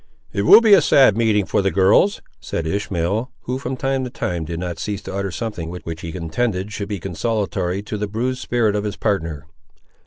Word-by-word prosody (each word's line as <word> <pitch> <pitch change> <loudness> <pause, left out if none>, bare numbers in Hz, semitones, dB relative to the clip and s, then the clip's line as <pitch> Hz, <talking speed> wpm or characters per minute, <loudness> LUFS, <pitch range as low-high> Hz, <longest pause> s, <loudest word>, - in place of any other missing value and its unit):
"It 100 +1 -1
will 225 - +10
be 220 -3 +6
a 195 - +8
sad 130 -7 +5
meeting 110 -3 +2
for - - +1
the 95 - +1
girls!" 100 - +3 0.2
said 80 - -4
Ishmael, 100 +5 -1
who, 125 +1 -3
from 130 -1 -4
time 135 0 -1
to 125 - -4
time, 85 -8 -3
did 85 +1 -5
not 90 -2 -4
cease 100 -2 -4
to - - -7
utter 100 0 -2
something 100 -5 -5
which 85 -2 -7
he 85 - -6
intended 95 +3 -2
should 100 0 -5
be 100 -2 -3
consolatory 95 +1 -2
to 105 0 -5
the 105 - -2
bruised 125 +5 -2
spirit 115 -4 +1
of 105 - -1
his 105 -1 -3
partner. 80 -8 -2
100 Hz, 210 wpm, -21 LUFS, 90-115 Hz, 0.2 s, will